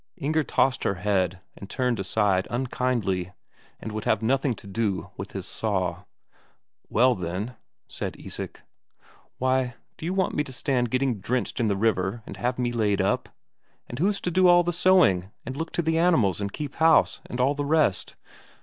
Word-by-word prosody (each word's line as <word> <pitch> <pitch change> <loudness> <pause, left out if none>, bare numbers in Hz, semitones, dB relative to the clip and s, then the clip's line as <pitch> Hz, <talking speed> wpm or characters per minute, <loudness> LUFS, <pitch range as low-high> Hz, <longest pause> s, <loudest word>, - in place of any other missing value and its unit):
Inger 155 0 0
tossed 135 -1 +1
her 100 - +1
head 95 -2 0
and 100 - -10
turned 125 -4 0
aside 95 -1 +1
unkindly, 120 -8 -1 0.5
and 110 - -6
would 110 0 -5
have 110 0 +1
nothing 135 +1 +1
to - - -12
do 100 -1 -2
with - - -7
his - - -4
saw. 95 -5 -2 0.8
"Well, 125 +3 +4
then 95 +6 -4 0.2
" - - -58
said - - -5
Isak. - - -6 0.7
"Why, 130 -1 +1 0.2
do - - -7
you 180 - -1
want 190 -2 +1
me 150 - +1
to 140 - -10
stand 125 -1 0
getting 130 -2 0
drenched 125 +6 -2
in 115 - +2
the 100 -2 +1
river 100 0 0
and - - -8
have 125 +1 -1
me 125 -1 0
laid 105 -4 +1
up? - - 0 0.6
And 120 - -7
who's 195 +4 +2
to 180 - -2
do 185 +2 +4
all 175 0 +6
the 175 0 -1
sewing, 165 - +4 0.2
and 130 +2 -5
look 160 +3 -4
to 175 - 0
the 160 +1 +1
animals 125 - +3
and 100 0 -2
keep 145 +3 -6
house, 160 0 +4
and 125 - -6
all 130 +3 +3
the 145 0 -3
rest?" 145 - +2
125 Hz, 185 wpm, -26 LUFS, 100-145 Hz, 0.8 s, all